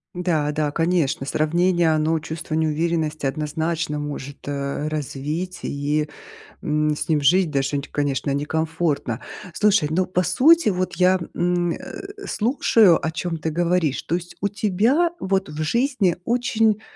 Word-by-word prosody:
Да 165 -5 0
да, 150 0 0
конечно, 165 -4 0
сравнение, 170 +4 +2
оно 155 +1 +1
чувство 155 0 -6
неуверенности 155 -1 0
однозначно 155 +2 -2
может, 145 -1 -5
э, 140 +1 -3
развить 155 +4 -4
и, 145 +2 -1 0.6
м, 150 -2 +1
с 160 - -4
ним 150 - +3
жить 175 +5 +3
даже, 140 0 0
н 140 - -2
конечно, 145 -1 -1
некомфортно. 150 -3 -1 0.3
Слушай, 200 -4 +3
но 185 +2 +1
по 180 0 0
сути 265 - +4
вот 185 -1 -2
я, 185 +1 +4
м, 175 -1 +1
э, 390 +10 -8
слушаю, 220 - +3
о 160 - 0
чём 165 0 -3
ты 160 +1 -3
говоришь. 170 -3 0
То 165 - -2
есть 175 0 -4
у 200 - +1
тебя 220 - +2
вот 190 -2 0
в 150 +1 -4
жизни 235 - +1
очень, 225 -3 +1
165 Hz, 145 wpm, -22 LUFS, 150-185 Hz, 0.6 s, сути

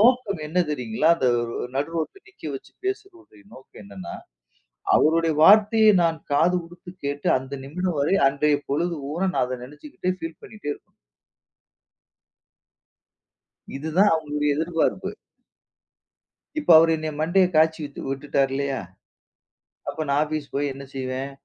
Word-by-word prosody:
நோக்கம் 230 -6 +3
என்ன 170 +4 -2
தெரியுங்களா? 125 +1 0
அந்த 130 -5 +1 0.5
நடு 145 +4 -2
ரோட்ல 165 - -4
நிக்க 375 - -19
வச்சு 135 - -9
பேசுற 370 - -6
நோக்கம் 130 -4 -15
என்னனா, 95 -3 -8 0.8
அவருடைய 165 +1 +3
வார்த்தைய 215 +4 +7
நான் 165 -1 +1
காது 170 +5 +3
குடுத்து 175 +2 -13 0.2
கேட்டு 145 0 -2
அந்த 130 +2 -8
நிமிடம் 170 +2 -3
வரை 150 +7 +2
அன்றைய 145 +2 +2
பொழுது 170 +5 0 0.2
ஊன 185 +4 0
நான் - - +2
அதை 130 0 -4
நனைச்சிக்கிட்டே 150 +4 -5
ஃபீல் 165 -1 -7
பண்ணிட்டே 210 -9 -7
இருக்கணும். - - -15 2.8
இதுதான் 160 +8 +2
அவங்களுடைய 150 -1 -1
எதிர்பார்ப்பு. 165 +1 0 1.5
இப்ப 290 - -1
அவர் 165 +1 +5
என்ன 155 0 -4
மண்டைய 180 +4 +3
காய்ச்சி 160 +1 +4
விட் 140 - -10
விட்டுட்டாரு 135 -1 0
இல்லயா. 140 -1 -1 1.1
அப்போ 155 - -3
நான் 140 +1 +2
ஆபீஸ் 155 -1 -3
போய் 140 0 0
என்ன 140 +1 -9
செய்வேன்? 130 +1 -4
155 Hz, 130 wpm, -24 LUFS, 140-175 Hz, 2.8 s, வார்த்தைய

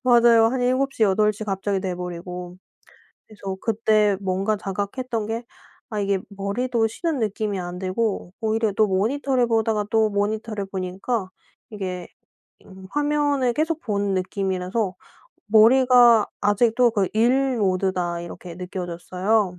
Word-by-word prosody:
맞아요. 235 -2 +6
한 250 +2 0
7:00, 255 0 +1
8:00 210 +1 +2
갑자기 195 -1 -1
돼 185 -2 -3
버리고. 180 0 -7 0.7
그래서 195 -3 -7
그때 215 -2 +2
뭔가 195 +3 0
자각했던 210 +4 -3
게 230 +2 -4 0.5
아 215 - -2
이게 200 -1 +1
머리도 225 +4 -1
쉬는 315 +5 -2
느낌이 210 -2 -2
안 175 0 -6
들고 190 -1 -2
오히려 220 -1 0
또 215 +2 +3
모니터를 245 +6 +1
보다가 220 -2 +1
또 220 -1 +3
모니터를 210 +1 -2
보니까 190 +3 -3 0.4
이게 185 -4 -5 0.6
음 190 0 -13
화면을 290 -3 +1
계속 315 +4 -1
보는 200 -3 -1
느낌이라서 190 +1 -2 0.5
'머리가 235 +1 +6
아직도 230 +3 +3
그 200 -4 +1
일 255 +3 +2
모드다.' 185 -3 0
이렇게 175 0 -9
느껴졌어요. 180 +2 -2
210 Hz, 275 characters per minute, -23 LUFS, 190-235 Hz, 0.7 s, 맞아요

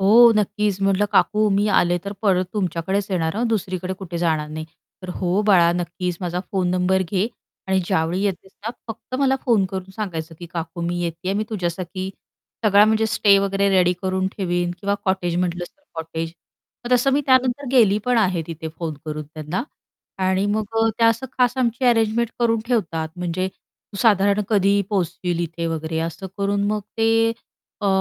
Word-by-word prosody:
हो, 230 +4 +7
नक्कीच. 210 -1 0
म्हटलं, 195 +1 +3
"काकू 215 +1 +3
मी 205 +1 +2
आले 175 0 +2
तर 200 - -4
परत 185 -3 +3
तुमच्याकडेच 190 0 -1
येणार 170 0 0
हा 230 - 0
दुसरीकडे 185 -4 -2
कुठे 175 -3 -5
जाणार 160 -3 0
नाही." 155 +1 -5 0.4
तर 185 - -8
"हो, 185 +2 0
बाळा 175 -5 +6
नक्कीच 175 0 -3
माझा 180 -1 -2
फोन 185 -2 +1
नंबर 185 +1 +2
घे 200 +1 +1 0.4
आणि 190 0 +2
ज्यावेळी 175 0 0
येतेस 190 -1 -3
ना - - 0 0.2
फक्त 225 +3 -8
मला 270 -1 +3
फोन 225 -6 +3
करून 190 0 -6
सांगायचं 165 -6 -4
की 175 - -8
"काकू 165 0 -5
मी 175 +1 -2
येतीये." 170 +2 -3
मी 215 +1 0
तुझ्यासाठी 185 -1 -3 0.5
सगळा 205 -1 +6
म्हणजे 220 +1 +2
स्टे 210 -2 +4
वगैरे 195 0 +1
रेडी 180 -2 +4
करून 190 0 0
ठेवीन 175 -2 0
किंवा 200 0 0
कॉटेज 185 -3 0
म्हटलं 175 -1 -1
तर" 295 - -36
"कॉटेज." 165 0 -4 0.5
मग 240 - -2
तसं 250 +2 +4
मी 285 - +3
त्यानंतर 260 +1 +3
गेली 215 -6 +5
पण 250 -1 +2
आहे 185 -6 +1
तिथे 160 -1 -6
फोन 165 -2 -3
करून 155 -1 -4
त्यांना 155 +6 -3 0.6
आणि 190 +1 +2
मग 215 +1 0 0.2
अ, 225 - +4
त्या 230 -1 +5
असं 230 +3 0
खास 250 0 +3
आमची 245 0 0
अरेंजमेंट 230 -1 +3
करून 230 -1 +2
ठेवतात. 165 -10 -1
म्हणजे 180 +1 -2 0.5
साधारण 205 -2 +4
कधी 200 -1 +3
पोहचशील 180 -2 -1
इथे 170 0 -3
वगैरे 160 0 -3
असं 165 +3 -4
करून 200 0 0
मग 210 0 0 0.2
ते 225 0 +3 0.5
अ, 205 - -1
190 Hz, 175 wpm, -22 LUFS, 175-215 Hz, 0.6 s, हो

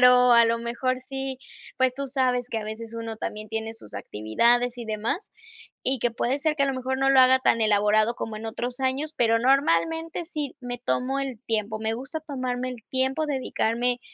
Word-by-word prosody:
pero, 250 0 +7
a 235 0 +7
lo 230 0 +1
mejor 240 +2 -1
sí, 270 0 -5 0.4
pues, 260 -1 +2
tú 275 +1 -3
sabes 250 -2 0
que 225 - -2
a 215 - -5
veces 225 +1 -7
uno 230 -1 -5
también 215 0 -5
tiene 225 0 -4
sus 110 - -12
actividades 235 - +1
y 240 - -5
demás, 220 - -3 0.5
y 265 +1 +1
que 240 +1 +1
puede 250 +4 0
ser 310 +1 +1
que, 280 - +1
a - - +3
lo 270 - -1
mejor, 260 +1 -2
no 270 0 +3
lo 270 - +5
haga 260 0 +7
tan 230 - +3
elaborado 215 +1 +3
como 225 -2 -5
en 220 +1 -6
otros 245 +2 -4
años, 270 +4 -1
pero, 230 -1 +3
normalmente, 280 - +2
sí, 300 -4 -4
me 245 -1 -5
tomo 255 +2 0
el 265 -5 -4
tiempo, 220 -1 -1
me 220 0 0
gusta 270 +7 -5
tomarme 255 -4 -3
el 240 -3 -9
tiempo, 265 +4 +1
dedicarme 245 -3 0
250 Hz, 205 wpm, -25 LUFS, 225-265 Hz, 0.5 s, pero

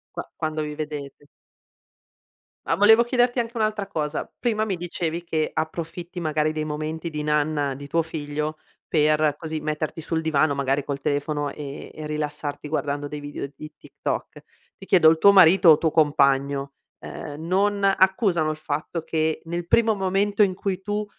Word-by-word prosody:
Qua - - -6
quando 155 0 -2
vi 150 -1 -4
vedete. 145 -2 -7 1.4
Ma - - +1
volevo 220 +3 +6
chiederti 245 0 +1
anche 235 0 -3
un'altra 215 -2 -1
cosa. 150 -4 -3
Prima 220 -3 0
mi 195 -5 -2
dicevi 170 -1 -4
che 160 -2 -1
approfitti, 170 +2 -4
magari, 155 0 0
dei 155 0 -2
momenti 155 +2 -4
di 150 -1 -4
nanna 150 -2 0
di 140 +1 -9
tuo 165 +3 +1
figlio 155 -1 -4 0.3
per, 150 -1 +2
così, 160 -1 -4
metterti 155 +1 -3
sul 160 +1 -2
divano, 155 -2 +2
magari, 140 0 0
col 140 -1 -4
telefono 145 0 -1
e 145 -1 -8
e 155 -1 -7
rilassarti 150 -1 -4
guardando 145 -2 -2
dei 150 - -5
video 145 -1 -6
di 155 +2 -9
TikTok. - - -5 0.4
Ti 195 - -12
chiedo: 170 -5 +6
il 160 - +3
tuo 200 +4 +6
marito 185 -2 +7
o 150 - +7
tuo 160 -1 0
compagno, 140 -2 +2 0.2
ehm, 150 +1 -8
non 200 +3 +1
accusano 190 -4 +3
il 155 - -2
fatto 155 +2 -4
che, 160 -1 -1
nel 170 +1 -4
primo 225 +2 +4
momento 200 +1 0
in 195 -2 +4
cui 190 0 -3
tu 210 +1 -2
155 Hz, 165 wpm, -24 LUFS, 150-185 Hz, 1.4 s, marito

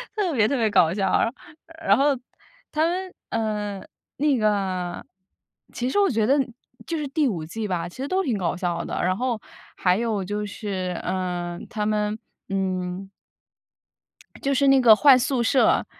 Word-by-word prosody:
特 395 -6 0
别 220 -5 +3
特 280 - 0
别 225 -2 +2
搞 170 -5 +4
笑， 195 +3 +2 0.6
然 200 - +5
后 275 0 +3 0.5
他 310 +1 +2
们 370 +2 -3 0.2
嗯， 210 -3 -2 0.3
那 290 -1 +2
个 190 -5 -1 0.7
其 245 +1 -2
实 410 - +1
我 400 - +4
觉 220 -4 +1
得 275 +5 +3 0.5
就 335 - -2
是 300 - -2
第 295 -1 +1
5 175 -9 -2
季 215 +6 -4
吧， 180 -3 -2
其 - - -15
实 270 +2 -3
都 380 +5 +1
挺 245 - 0
搞 180 -2 -1
笑 175 -2 -2
的， - - -4
然 185 +1 +1
后 245 -2 -1 0.4
还 180 0 +3
有 220 -3 -1
就 205 +2 -3
是， 190 -4 -4
呃， 180 -2 -3
他 210 -1 -2
们 210 0 0 0.3
嗯。 190 0 -2 1.3
就 275 - +1
是 275 +1 +3
那 270 0 +6
个 225 -3 +8
换 270 +2 +7
宿 255 -1 0
舍， 255 +3 +3
215 Hz, 175 characters per minute, -24 LUFS, 185-270 Hz, 1.3 s, 个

